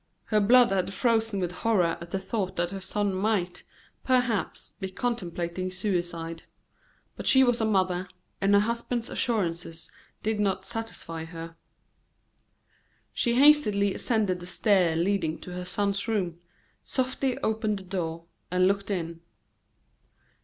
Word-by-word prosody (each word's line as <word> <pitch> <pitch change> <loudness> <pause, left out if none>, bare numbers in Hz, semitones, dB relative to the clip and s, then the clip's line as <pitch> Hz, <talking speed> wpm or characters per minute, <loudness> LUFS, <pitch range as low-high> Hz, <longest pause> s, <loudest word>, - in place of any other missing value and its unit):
Her 215 - +2
blood 240 +3 +6
had 195 0 0
frozen 225 -4 +1
with 175 -2 -1
horror 180 -4 +1
at 170 - -8
the 195 - -1
thought 190 0 -3
that 175 +1 0
her 195 -1 -5
son 205 +1 -1
might, 185 -2 0 0.4
perhaps, 250 -5 0
be 190 -2 -3
contemplating 185 -5 -3
suicide; 175 -4 -2 0.7
but - - -6
she 265 0 +7
was 245 -2 +2
a - - +2
mother, 185 -3 +1 0.3
and 200 +1 +4
her 200 - +6
husband's 235 +2 -2
assurances 170 -7 -1 0.3
did 215 0 0
not 195 -2 0
satisfy 225 -8 -4
her. 165 0 -8 1.6
She 235 -1 +1
hastily 235 -9 +5
ascended 210 -7 0
the 175 - -8
stairs 180 -4 +2
leading 170 -3 0
to 180 - -8
her 180 0 -5
son's 200 +2 -1
room, 185 -7 -1 0.4
softly 260 0 -1
opened 215 -1 0
the 190 - -9
door, 170 -3 -4 0.2
and 180 +1 +3
looked 200 +1 0
in. 170 -4 -3
195 Hz, 140 wpm, -27 LUFS, 175-220 Hz, 1.6 s, she